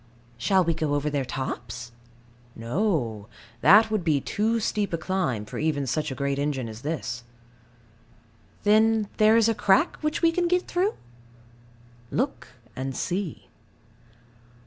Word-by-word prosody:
Shall 185 +11 +2
we 170 -1 +1
go 155 -2 -1
over 145 +1 -1
their 140 -2 0
tops? 125 -2 -5 0.6
No. 115 - -1 0.3
That 215 +6 +7
would 215 -4 0
be 155 -4 +2
too 220 - 0
steep 210 -3 -1
a - - +1
climb, 165 - -1
for - - -7
even 150 -3 0
such 135 +4 -1
a 130 - -5
great 140 0 -1
engine 140 -4 -1
as 110 +1 -9
this. 125 -5 -4 1.4
Then 215 0 +3
there 215 +1 +5
is 230 -1 +4
a 225 - +3
crack 210 - +2
which 305 +2 -2
we 330 - +5
can 350 +1 0
get 360 +1 +1
through? 375 +4 0 1.1
Look 265 +5 -2 0.3
and 130 0 -4
see. 185 -3 -3
165 Hz, 145 wpm, -26 LUFS, 135-215 Hz, 1.4 s, That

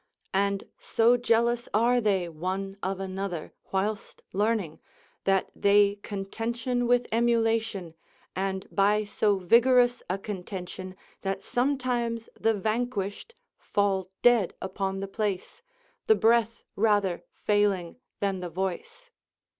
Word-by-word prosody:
And 200 0 +1 0.2
so 230 +2 +3
jealous 235 0 +1
are 240 +3 +4
they 195 -5 +1
one 185 +4 -4
of 190 0 -2
another, 190 -3 -4 0.2
whilst 205 +2 -2
learning, 205 -5 0 0.5
that 195 -1 +2
they 200 0 +4
contention 230 +5 -2
with 245 0 +3
emulation, 225 -5 +1 0.4
and 190 0 -2
by 210 +2 +3
so 205 0 +1
vigorous 245 +6 +4
a 185 - 0
contention 185 -2 -6 0.3
that 195 0 -3
sometimes 245 -3 -1
the 225 0 +1
vanquished 215 - -2 0.2
fall 195 -2 0
dead 240 -7 +4
upon 195 0 -3
the 195 - -3
place, 205 - -3 0.5
the 440 - +6
breath 230 - +2
rather 205 -4 +2
failing 205 -4 +1 0.2
than 195 -2 0
the 180 -1 -5
voice. 325 - -5
205 Hz, 115 wpm, -27 LUFS, 190-235 Hz, 0.5 s, the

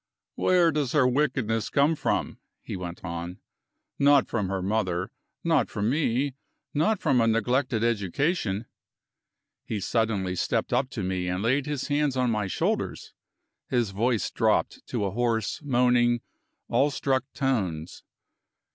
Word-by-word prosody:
"Where 175 -2 +3
does 145 -4 -1
her 140 -4 +4
wickedness 125 -5 0
come 145 +2 +3
from?" - - -1 0.2
he - - -5
went 90 0 -7
on. 85 +1 -5 0.6
"Not 140 -2 +5
from 105 -4 -1
her 95 -1 -2
mother; 95 -1 -1 0.3
not 165 -3 +2
from 105 +2 -1
me; 140 -2 +1 0.4
not 165 +9 +2
from 135 -6 +2
a 115 - +3
neglected 115 +1 +1
education." 115 - 0 1.0
He 110 - -3
suddenly 100 -3 0
stepped - - -1
up 130 0 +1
to 115 -7 -4
me 90 -1 -2
and 90 +2 -2
laid 130 +5 +1
his 145 -3 -2
hands 145 -2 +1
on 125 -2 +2
my 105 -3 -1
shoulders; - - -2 0.6
his 120 -5 +1
voice 115 +2 0
dropped - - +1
to 100 - -1
hoarse, 115 - -1
moaning, 120 -3 +3 0.5
awestruck 135 -2 +1
tones. 95 - -2
120 Hz, 135 wpm, -26 LUFS, 100-140 Hz, 1.0 s, Not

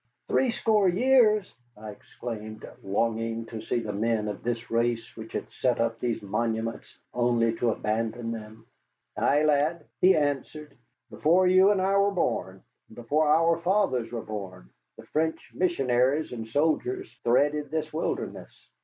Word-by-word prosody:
"Threescore 220 -5 +2
years!" 215 0 +3 0.2
I 105 0 -8
exclaimed, 110 0 -8
longing 115 +3 -1
to 115 -1 -7
see 120 - -1
the 105 -2 -4
men 110 +1 0
of 105 - -6
this 120 0 -4
race 115 0 -1
which 110 0 -10
had - - -5
set 125 -2 0
up 115 0 0
these 120 -3 -2
monuments 115 +2 -3 0.2
only 120 -2 +2
to 120 - +1
abandon 115 +2 -2
them. 110 0 -9 0.5
"Ay, 145 +2 +2
lad," 150 +2 +1
he 185 +1 +6
answered, 150 0 -2 0.4
"before 175 +4 +3
you 185 +2 +6
or 205 -2 +2
I 190 +1 +1
were 200 0 +4
born, 95 - -2 0.2
and - - -16
before 145 +6 0
our 165 +2 +3
fathers 170 - +1
were 115 -2 -4
born, 95 - -7 0.3
the - - -12
French 160 +1 -2
missionaries 135 -4 +1
and 115 -2 -6
soldiers 165 - -1
threaded 145 +4 +2
this 155 0 -3
wilderness. 160 - -5
125 Hz, 145 wpm, -27 LUFS, 115-165 Hz, 0.5 s, he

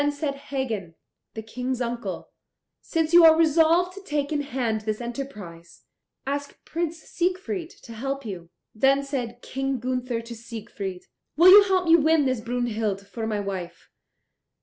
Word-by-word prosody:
Then 290 0 +2
said 285 0 -3
Hagen, 255 -11 -4 0.4
the 220 - -5
King's 250 +3 -4
uncle, 240 0 -4 0.5
"Since 325 -1 -1
you 345 0 +9
are 320 -1 +8
resolved 330 +3 +4
to 395 - -10
take 295 -5 -2
in 295 -1 0
hand 245 -6 -2
this 215 0 -3
enterprise, 210 -10 -8 0.4
ask 285 +1 -4
Prince 330 -1 -3
Siegfried 365 -1 -2
to 230 - -10
help 270 +3 -4
you." 175 -5 -7 0.2
Then 270 +5 +3
said 245 -4 -4
King 270 0 -2
Gunther 250 -1 -2
to 235 +1 -9
Siegfried, 215 -5 -7 0.3
"Will 345 +3 +8
you 410 +2 +11
help 375 -2 +1
me 330 0 +7
to - - +1
win 315 -1 +3
this 255 -3 0
Brunhild 225 -4 -2
for 225 +2 -5
my 215 -2 -1
wife? 185 -4 -6
260 Hz, 160 wpm, -25 LUFS, 220-310 Hz, 0.5 s, you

